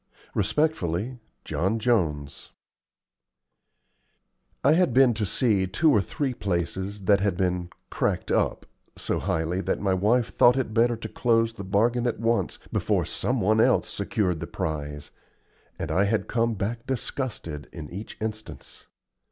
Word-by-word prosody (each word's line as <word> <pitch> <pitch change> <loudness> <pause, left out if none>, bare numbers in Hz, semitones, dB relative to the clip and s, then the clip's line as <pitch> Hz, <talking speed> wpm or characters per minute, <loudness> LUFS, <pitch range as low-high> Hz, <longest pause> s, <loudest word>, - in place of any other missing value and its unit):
Resp'y 125 - 0 0.3
John 95 +6 0
Jones 85 - 0 2.1
I 140 - +5
had 165 -8 +2
been 130 -2 +6
to 105 -2 -2
see 105 -3 +2
two 150 - +3
or 105 - +4
three 130 - -2
places 95 0 -3
that 100 +1 +4
had 95 -3 0
been 90 -1 0 0.2
"cracked - - -1
up" - - +1 0.3
so - - -1
highly 80 +3 -1
that - - -1
my 100 -2 +1
wife 110 +6 +1
thought 120 +2 +6
it 130 -5 -1
better 120 +2 +3
to 115 - -6
close 115 -2 +1
the 115 - -7
bargain 115 +6 +1
at 120 - -2
once 115 +1 0
before - - +1
some - - -1
one 110 +3 +3
else - - +3
secured 90 -6 -1
the - - -5
prize 75 -1 -4 0.7
and - - -4
I 100 - +3
had 110 +2 0
come 115 -1 +1
back 115 +5 -3
disgusted 120 - -4
in 80 -3 -7
each 100 +5 -7
instance. 110 0 -6
105 Hz, 145 wpm, -26 LUFS, 95-120 Hz, 2.1 s, been